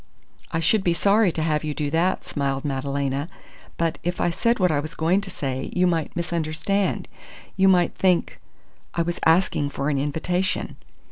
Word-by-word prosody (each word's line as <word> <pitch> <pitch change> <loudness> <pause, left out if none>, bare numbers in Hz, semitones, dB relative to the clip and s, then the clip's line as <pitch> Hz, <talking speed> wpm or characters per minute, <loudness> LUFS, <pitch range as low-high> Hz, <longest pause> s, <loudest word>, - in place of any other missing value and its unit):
"I 165 - 0
should 190 +5 +2
be 175 -2 +2
sorry 200 +2 +3
to 160 - -2
have 155 -1 0
you 150 -1 -3
do 145 -2 -2
that!" 175 +4 +1
smiled 135 -1 -2
Madalena. 140 +1 -2 0.5
"But 165 -1 -1
if 175 +1 -3
I 175 - +2
said 230 +7 +1
what 180 -3 +3
I 145 - +1
was 155 +2 -6
going 175 +5 +2
to 200 - -6
say, 135 -6 -4
you 180 0 +3
might 165 -4 0
misunderstand. 170 +3 -1 0.5
You 195 0 +4
might 180 -2 +4
think 185 -2 +1 0.6
I 170 - +2
was 175 +1 -3
asking 160 -3 +3
for 140 0 -2
an 140 - 0
invitation." 175 +7 -1
165 Hz, 180 wpm, -24 LUFS, 145-180 Hz, 0.6 s, You